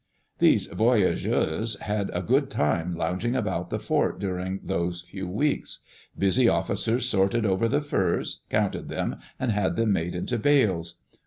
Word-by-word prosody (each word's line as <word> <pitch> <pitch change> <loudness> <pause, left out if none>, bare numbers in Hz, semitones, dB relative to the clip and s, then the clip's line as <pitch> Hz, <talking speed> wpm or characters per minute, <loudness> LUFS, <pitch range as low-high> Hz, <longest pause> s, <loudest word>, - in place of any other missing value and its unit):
Those - - +4
voyageurs 110 -2 +1
had 105 -1 -2
a 90 - -2
good 135 +6 +2
time 85 - 0
lounging 90 +9 -1
about 130 - -1
the - - -1
fort - - 0
during 95 0 -3
those 85 +1 -2
few 95 +2 -7
weeks. 140 +11 -1 0.3
Busy 115 +5 +4
officers 120 +2 0
sorted 100 +1 +2
over 95 +3 +2
the 145 +6 +1
furs, 95 -12 -1
counted - - -1
them, - - -2 0.2
and 130 -3 0
had 100 -2 0
them 115 -2 +2
made 85 -1 -1
into 115 +7 -2
bales. 95 - +2
100 Hz, 150 wpm, -26 LUFS, 90-120 Hz, 0.3 s, Those